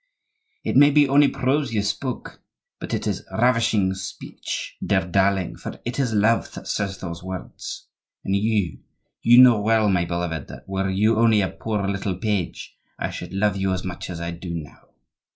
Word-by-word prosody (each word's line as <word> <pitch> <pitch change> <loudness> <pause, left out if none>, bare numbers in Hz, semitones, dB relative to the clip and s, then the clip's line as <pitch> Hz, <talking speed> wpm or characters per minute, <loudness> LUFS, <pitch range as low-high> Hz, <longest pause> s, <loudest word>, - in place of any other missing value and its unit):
"It - - -2
may 145 +2 +8
be 145 0 +5
only 140 +2 +5
prose 135 0 0
you 105 -2 +1
speak, 125 +5 -3 0.5
but - - -6
it - - -2
is - - -2
ravishing 115 -5 +2
speech, 95 -1 -6
dear 95 -3 +1
darling, 95 0 +1
for - - -8
it 120 +3 -3
is 130 -4 +1
love 110 +2 +2
that - - -9
says 100 -2 -2
those 85 -2 -6
words. 95 0 -7 0.4
And 95 - +1
you—you 105 - +1
know 120 -4 +6
well, 110 0 +3
my 90 -3 +2
beloved, 85 -3 -3
that 65 0 -11
were 95 0 -1
you 105 +4 +2
only 115 -2 +5
a 95 - 0
poor 100 +4 -3
little 100 -1 -2
page, 100 -4 -3 0.2
I - - -3
should - - -7
love 100 +1 +1
you 95 -1 0
as 95 - -3
much 95 -1 -6
as 85 -2 -5
I 85 0 -3
do 85 0 -6
now. 75 -3 -9
100 Hz, 180 wpm, -23 LUFS, 90-115 Hz, 0.5 s, may